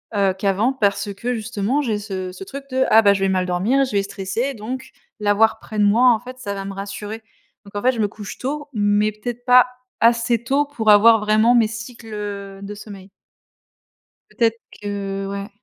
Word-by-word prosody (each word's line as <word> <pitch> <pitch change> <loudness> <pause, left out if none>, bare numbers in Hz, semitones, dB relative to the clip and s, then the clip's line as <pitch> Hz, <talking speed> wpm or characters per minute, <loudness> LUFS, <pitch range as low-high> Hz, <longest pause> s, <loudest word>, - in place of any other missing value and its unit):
heu, 195 -2 +2
qu'avant. 200 +6 +1
Parce 200 -4 0
que, 240 +5 -3
justement 225 +4 -1
j'ai 220 -7 -1
ce 190 -3 -5
ce 185 +1 -9
truc 275 +7 -8
de: 260 0 +2
«Ah 220 - +7
bah, 200 -2 +5
je 195 - -3
vais 195 - +2
mal 185 -1 +1
dormir, 195 +10 +1
je 260 - -7
vais 200 -1 +1
stresser». 200 +7 -3
Donc, 250 +3 -6 0.3
l'avoir 215 +2 +3
près 215 -1 -6
de - - +4
moi, 240 +5 +5
en 220 - -1
fait, 250 +2 -10
ça 205 -5 -4
va 195 -1 -5
me 195 - -5
rassurer. 205 +3 -6 0.4
Donc 200 - -15
en 205 - -2
fait, 255 - +4
je 240 - -6
me 210 - +2
couche 205 0 -9
tôt, 290 +3 -4
mais 205 0 +2
peut-être 240 +3 -7
pas 250 0 +7 0.3
assez 235 0 +3
tôt 275 +4 +1
pour 245 -7 -2
avoir 225 +2 +7
vraiment 215 +3 +3
mes 230 -2 +4
cycles, 225 +1 -9
heu, 200 -2 -6
de 200 +1 -7
sommeil. 200 -2 -11 1.2
Peut-être 230 -1 0 0.2
que, 195 -1 -4
ouais. 200 0 -5
215 Hz, 205 wpm, -21 LUFS, 200-240 Hz, 1.2 s, Ah